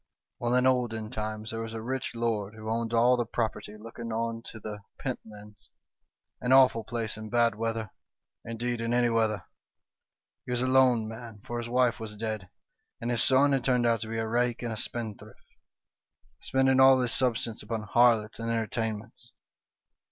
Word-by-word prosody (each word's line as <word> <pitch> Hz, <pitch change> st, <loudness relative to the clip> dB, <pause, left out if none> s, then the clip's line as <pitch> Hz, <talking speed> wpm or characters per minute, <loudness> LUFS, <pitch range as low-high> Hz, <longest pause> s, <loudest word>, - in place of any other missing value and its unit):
" -, -, -61 dB
Well, 120 Hz, +1 st, +1 dB
in 125 Hz, 0 st, +3 dB
olden 120 Hz, -4 st, +1 dB
times 110 Hz, 0 st, -4 dB
there 115 Hz, 0 st, -4 dB
was 115 Hz, 0 st, -5 dB
a 110 Hz, -, -4 dB
rich 130 Hz, 0 st, -3 dB
lord, 110 Hz, -3 st, -1 dB
who 110 Hz, 0 st, -5 dB
owned 115 Hz, 0 st, -1 dB
all 120 Hz, +2 st, +5 dB
the 120 Hz, -, 0 dB
property 110 Hz, -2 st, -3 dB
looking 115 Hz, +1 st, -8 dB
on 115 Hz, 0 st, -2 dB
to 110 Hz, -, -8 dB
the 105 Hz, -1 st, -6 dB, 0.2 s
Pentlands 105 Hz, -1 st, -8 dB, 0.7 s
an 125 Hz, -, 0 dB
awful 130 Hz, -4 st, +6 dB
place 115 Hz, -3 st, -4 dB
in 110 Hz, 0 st, -7 dB
bad 120 Hz, 0 st, +3 dB
weather; 115 Hz, 0 st, -3 dB, 0.5 s
indeed, 115 Hz, +1 st, -3 dB
in 115 Hz, +1 st, 0 dB
any 120 Hz, -1 st, +3 dB
weather. 110 Hz, -5 st, +1 dB, 0.5 s
" -, -, -63 dB
He -, -, -7 dB
was 125 Hz, 0 st, 0 dB
a -, -, +1 dB
lone 130 Hz, -4 st, +4 dB
man, 115 Hz, -2 st, -9 dB
for 120 Hz, 0 st, -3 dB
his 120 Hz, 0 st, -5 dB
wife 125 Hz, -1 st, +2 dB
was 105 Hz, -2 st, -6 dB
dead, 110 Hz, -3 st, -4 dB, 0.5 s
and 120 Hz, +1 st, -2 dB
his 120 Hz, -, +2 dB
son 135 Hz, +2 st, +4 dB
had 135 Hz, -3 st, +1 dB
turned 125 Hz, -2 st, +2 dB
out 115 Hz, -2 st, +2 dB
to 110 Hz, -, -4 dB
be 115 Hz, -, -3 dB
a 110 Hz, 0 st, -1 dB
rake 120 Hz, +1 st, 0 dB
and 115 Hz, -2 st, -2 dB
a -, -, -4 dB
spendthrift, 110 Hz, -2 st, -6 dB, 0.9 s
spending 135 Hz, 0 st, +2 dB
all 130 Hz, 0 st, +7 dB
his 125 Hz, -2 st, +1 dB
substance 120 Hz, -3 st, +1 dB
upon 110 Hz, 0 st, -4 dB
harlots 115 Hz, 0 st, +3 dB
and 115 Hz, 0 st, -3 dB
enter 115 Hz, -1 st, 0 dB
tainments. 110 Hz, +2 st, -5 dB
115 Hz, 190 wpm, -28 LUFS, 110-120 Hz, 0.9 s, all